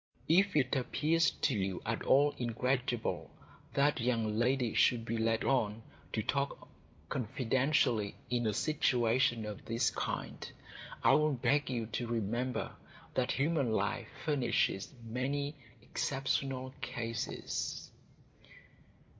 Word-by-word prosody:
If 190 +3 +4
it 135 -3 +3
appears 155 +5 +2
to 135 - 0
you 95 -3 -1
at 115 0 -1
all 145 +2 +4
incredible 125 0 -1 0.5
that 140 -2 +3
young 115 -3 +1
ladies 120 +1 +2
should 115 -2 +4
be 115 - -2
led 115 0 +1
on 110 -5 +1 0.3
to 110 - 0
talk 140 +5 -2 0.4
confidentially 125 - +1
in 120 -2 0
a - - +2
situation 125 -4 +2
of 105 -2 -7
this 115 +1 +1
kind, - - -4 0.5
I - - +6
will 150 +1 +4
beg 135 +3 +1
you 120 -3 -1
to 115 +2 -3
remember 115 +2 -1 0.4
that 130 0 +1
human 140 -5 +1
life 105 +3 0 0.2
furnishes 120 -9 +1
many 135 +5 -2 0.3
exceptional 130 -1 -1
cases. 115 -1 -3
125 Hz, 115 wpm, -33 LUFS, 115-135 Hz, 0.5 s, I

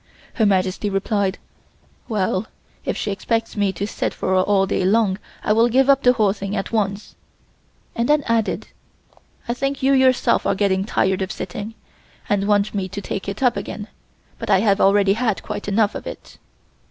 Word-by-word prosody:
Her 220 -3 +2
Majesty 190 +1 +1
replied: 195 0 0 0.7
"Well, 195 -1 0 0.4
if - - -2
she - - -2
expects 225 +3 -2
me 205 -2 +1
to 200 - -3
sit 210 - -3
for - - -3
her 190 - +3
all 195 0 +2
day 190 - -1
long 200 0 +2 0.2
I 210 - +2
will 230 +2 +4
give 265 +3 +4
up 275 0 +3
the 250 -2 +5
whole 210 -5 +2
thing 200 0 -5
at 195 - -3
once," 205 -2 -2 0.8
and 235 +3 -1
then 300 -1 +4
added: 230 -2 -1 0.8
"I 235 - 0
think 275 +2 -3
you 275 +1 +4
yourself 260 -1 +3
are - - +2
getting 195 -1 +1
tired 190 -2 0
of 190 - -2
sitting, 205 +4 -6 0.5
and 200 -1 0
want 205 0 +2
me 195 -2 -2
to 205 - -5
take 200 0 -4
it 200 +6 -5
up 245 -2 +3
again, 210 0 -6 0.5
but - - -6
I 195 -2 +4
have 200 -2 +2
already 195 0 +4
had 225 -2 -1
quite 205 - -5
enough 205 +1 +2
of - - -7
it." - - -10
205 Hz, 190 wpm, -21 LUFS, 195-230 Hz, 0.8 s, the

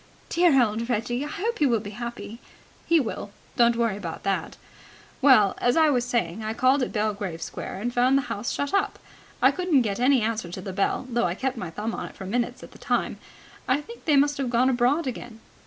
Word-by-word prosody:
"Dear 335 -5 +4
old 230 0 0
Reggie! 240 +3 -1
I - - -4
hope 430 +10 -3
he 295 - +4
will 235 -3 +2
be 205 -1 -8
happy." 235 0 -7 0.5
"He 335 -1 +5
will. 225 -5 -4 0.3
Don't 235 -1 +4
worry 230 -4 +1
about 170 -5 -6
that. 195 -1 -2 0.6
Well, 255 -8 +6
as 245 +3 +2
I 315 -2 +5
was 245 -3 +1
saying, 220 -5 -1
I 220 +1 -3
called 260 +3 +3
at 250 - -1
Belgrave 205 -5 -2
Square, - - -6
and 240 +2 -2
found 255 +2 +4
the 275 - +1
house 230 -2 -4
shut 285 +3 -3
up. 400 +1 +1 0.5
I - - +7
couldn't 355 -8 +2
get 200 -2 -2
any 255 -1 +4
answer 220 -5 -2
to 185 - -5
the 190 0 -6
bell, 200 +6 0
though 240 -3 0
I 175 0 -1
kept 265 +4 -2
my 185 -7 -5
thumb 210 +7 -4
on - - -4
it - - -13
for 190 - -8
minutes 240 +5 -2
at - - -12
a - - -15
time. - - -1 0.5
I 255 +3 +2
think 465 +10 -12
they 300 - +3
must 285 +1 +3
have 265 -3 -1
gone 245 +2 +3
abroad 255 +6 +2
again." 240 -3 -6
240 Hz, 225 wpm, -25 LUFS, 215-270 Hz, 0.6 s, I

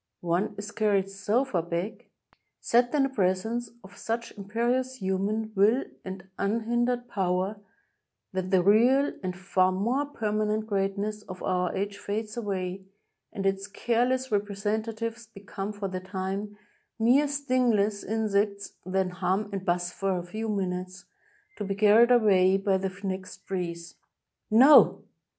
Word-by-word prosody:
One 175 +4 0
is 205 +1 -6
carried 200 -3 +1
so 205 +6 0
far 190 -10 -1
back 170 +5 -4 0.2
— - - -39
set 240 +1 +4
in 285 - +4
the 270 - +1
pres 185 -6 +1
ence 235 +1 -3
of 195 +1 -14
such 230 +1 -3
imperious 240 +6 -1
human 205 +2 -1
will 215 +6 +3 0.2
and 190 -1 -8
unhindered 240 +4 0
power 190 -1 -1 0.4
— - - -55
that 185 0 -2
the 185 -2 +3
real 245 +8 +4
and 185 -2 -4
far 185 0 +2
more 240 +10 0
permanent 215 -4 -1
greatness 200 +1 -2
of 185 0 -8
our 180 -1 0
age 200 +1 -3
fades 215 +1 -4
away, 190 -4 -3 0.5
and 195 - -5
its 195 0 0
careless 245 +4 0
representatives 220 +3 -2
become, 200 -1 -6
for 205 -1 -4
the 185 -1 -4
time, 190 +2 -4 0.4
mere 250 +6 +4
stingless 250 -8 +1
insects, 205 -2 -1
that 190 0 0
hum 190 +3 -1
and 195 -1 -4
buzz 175 0 0
for 195 -1 -1
a 175 - -4
few 220 +5 -4
minutes, 185 -2 -3 0.5
to - - -3
be 195 0 -2
carried 215 +3 +6
away 195 -6 +5
by 195 0 +1
the 190 0 -1
next 190 -1 -5
breeze. 170 -3 -5 0.5
No 260 +7 +7
205 Hz, 145 wpm, -27 LUFS, 190-225 Hz, 0.5 s, No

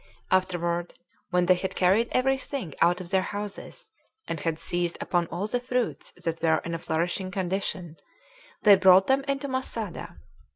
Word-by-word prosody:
Afterward, 175 -2 0 0.3
when 180 -1 +2
they 185 - +6
had 185 +1 -3
carried 195 +6 +3
every 265 +1 +2
thing 255 - -5
out 175 +2 +4
of 175 - -8
their 190 - +3
houses, 205 - -6 0.4
and 165 - -3
had 165 0 -1
seized 175 +1 -2
upon 175 -2 0
all 175 +5 -3
the 245 +3 -1
fruits 250 0 -2
that 165 0 -4
were 160 -1 +3
in 170 - -3
a 165 - -2
flourishing 175 +3 -1
condition, 185 -3 -3 0.7
they 205 -2 +9
brought 190 0 +7
them 270 +1 +2
into 275 0 -1
Masada. 235 -8 -4
185 Hz, 165 wpm, -27 LUFS, 175-215 Hz, 0.7 s, they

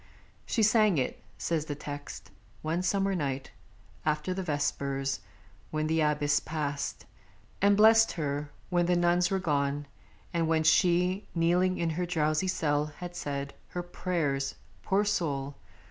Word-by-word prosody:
She 225 - +1
sang 215 -4 +4
it 130 - -1 0.2
(says 160 -3 -1
the 145 - -4
text) 145 -9 -8 0.3
one 160 +3 0
summer 195 +2 +1
night, 135 -6 -2 0.5
After 155 +4 0
the 190 - -3
vespers, 140 -4 -1 0.5
when 155 0 -1
the 160 +1 +1
Abbess 150 -1 +2
passed 145 -3 -3 0.6
And 200 0 +5
blessed 225 +1 +6
her; 145 -2 -2 0.2
when 175 -1 +2
the 180 - +3
nuns 175 +1 +3
were 195 - +1
gone, 145 -4 0 0.5
and 165 -1 +1
when 160 -1 +2
She, 180 +4 +3
kneeling 180 +2 +2
in 170 -1 0
her 175 +3 -2
drowsy 155 +1 +1
cell, 150 -5 +1
had 175 -1 -7
said 140 -3 -4
Her 175 - -4
prayers 160 -6 -1 0.3
(poor 200 +2 +1
soul!) 145 -9 -1
160 Hz, 145 wpm, -29 LUFS, 145-180 Hz, 0.6 s, blessed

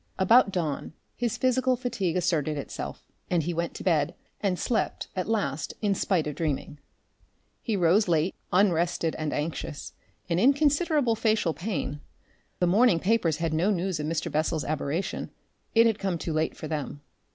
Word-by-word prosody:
About 205 +3 +5
dawn, 160 -5 -2 0.2
his 235 -1 -1
physical 255 +1 +2
fatigue 235 -9 -2
asserted 160 -4 0
itself, 140 - -6 0.3
and 170 -3 +2
he 175 - -2
went 170 +1 -2
to - - -7
bed 160 -4 +1 0.3
and 190 -3 +1
slept 230 +4 -1
at 185 +2 -2
last 155 -9 -1
in 205 -2 +1
spite 185 -4 +1
of 150 - -3
dreaming. 150 -1 -3 0.8
He 225 - -1
rose 190 +3 +3
late, 165 +1 +2 0.2
unrested 175 -3 +2
and 155 -1 -2
anxious, 150 -1 -4 0.3
and 170 0 +1
in 265 +8 +6
considerable 290 -3 +2
facial 220 -6 +1
pain. 155 -7 -3 0.6
The 180 - +2
morning 195 0 +4
papers 185 -5 +2
had 165 -1 -1
no 170 +6 +2
news 185 -3 0
of 150 - -2
Mr. 160 -1 -2
Bessel's 155 0 0
aberration 155 +4 -2 0.5
it 230 +1 +7
had 225 -2 +2
come 190 -3 -1
too 165 0 -3
late 155 +1 -1
for 155 - -6
them. 150 -2 -4
175 Hz, 165 wpm, -27 LUFS, 155-215 Hz, 0.8 s, it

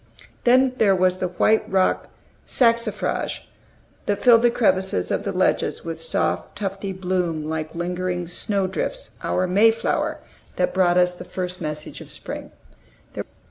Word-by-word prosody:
Then 255 +1 +5
there 200 -3 +5
was 185 0 +2
the 185 - 0
white 200 +5 +2
rock 190 -1 +2 0.4
saxifrage, 230 -3 +1 0.7
that 205 -1 +1
filled 235 -2 +6
the 240 - +5
crevices 190 - +1
of - - -1
the - - -1
ledges - - 0
with 165 -1 -5
soft, 85 - -1
tufty 195 -1 -3
bloom 180 -4 -1
like 155 +1 -4
lingering 180 +1 -2
snow 195 +3 -1
drifts, - - -3
our 185 - 0
May 200 +5 +5
flower, 225 - -1 0.4
that 180 - 0
brought 180 -1 +3
us 180 0 +4
the 180 - -9
first 180 0 -4
message 150 0 -5
of - - -12
spring. - - -7
185 Hz, 145 wpm, -23 LUFS, 175-205 Hz, 0.7 s, filled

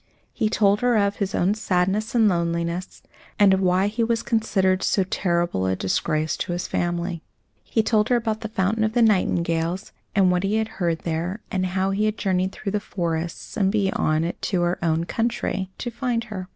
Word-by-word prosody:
He 220 -3 0
told 205 -2 +3
her 245 -2 +3
of 200 -1 +1
his 195 -2 -2
own 185 +3 +2
sadness 205 +2 0
and 225 -2 +5
loneliness, 170 0 -2 0.3
and 200 -2 +6
of 190 - +1
why 185 +1 +3
he 220 +3 0
was 230 0 0
considered 190 -5 +1
so 195 - +2
terrible 170 - 0
a 95 - +1
disgrace 155 - 0
to 175 - -3
his 175 - -3
family. 175 -1 -2 0.4
He 225 - 0
told 215 -1 +2
her 250 - +4
about 225 -2 -1
the 220 - -3
fountain 215 +1 0
of 220 0 0
the 240 -1 +4
nightingales 170 -4 +1 0.2
and 190 -3 +4
what 180 0 +1
he 195 +2 0
had 220 0 0
heard 170 -3 0
there 170 +5 -3
and 185 -1 0
how 190 +1 +1
he 205 +2 +1
had 215 0 0
journeyed 185 -1 0
through 195 - -5
the 210 - 0
forests, 170 -4 -4
and 195 -2 +2
beyond 190 -6 +1
it 175 - -3
into 185 -4 0
her 175 -1 -1
own 165 0 +1
country, 210 -2 -2
to 240 - -4
find 235 -1 -1
her. 200 -5 -7
190 Hz, 200 wpm, -23 LUFS, 175-215 Hz, 0.4 s, and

